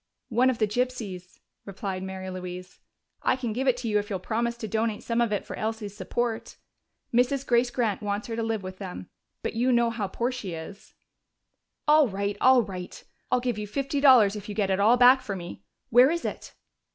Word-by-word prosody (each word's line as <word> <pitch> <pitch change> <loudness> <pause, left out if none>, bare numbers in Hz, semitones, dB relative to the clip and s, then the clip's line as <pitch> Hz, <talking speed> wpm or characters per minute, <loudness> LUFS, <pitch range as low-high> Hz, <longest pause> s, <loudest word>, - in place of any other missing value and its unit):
"One 245 +2 +3
of 255 - 0
the 220 - +2
gypsies," 210 -6 -4 0.2
replied 195 -1 -5
Mary 190 0 -6
Louise. 180 0 -8 0.4
"I - - +2
can 245 -4 -3
give 260 +4 -2
it 250 -1 +3
to 245 -1 -4
you 210 -1 +2
if 205 - -6
you'll 195 - -1
promise 235 +5 -2
to 220 - -5
donate 220 +1 -1
some 230 0 0
of 235 -2 +1
it 205 - -1
for - - -6
Elsie's 215 -2 -4
support. 235 +1 -3 0.6
Mrs. 255 +3 +2
Grace 240 0 +3
Grant 230 -5 -1
wants 205 0 -2
her 230 - -4
to 230 - -2
live 225 -3 -2
with 185 0 -8
them, 185 -2 -7 0.3
but - - -2
you 245 +3 +1
know 235 -1 +3
how 220 -3 -3
poor 235 +6 -2
she 210 -9 -5
is 165 +6 -10 0.9
now." 300 - +6
"All 305 -3 +6
right, 200 0 -2
all 255 -1 +6
right, 185 -3 -8 0.3
I'll 250 - +4
give 245 -4 -2
you 210 - -4
fifty 275 +5 -2
dollars 240 -8 +6
if 210 0 -8
you 205 - -5
get 200 -3 0
it 190 - +1
all 220 +5 +5
back 250 +2 +7
for 200 - -4
me! 175 -2 -8 0.3
Where 245 +3 +7
is 340 +1 -2
it?" - - -6
220 Hz, 215 wpm, -26 LUFS, 200-245 Hz, 0.9 s, back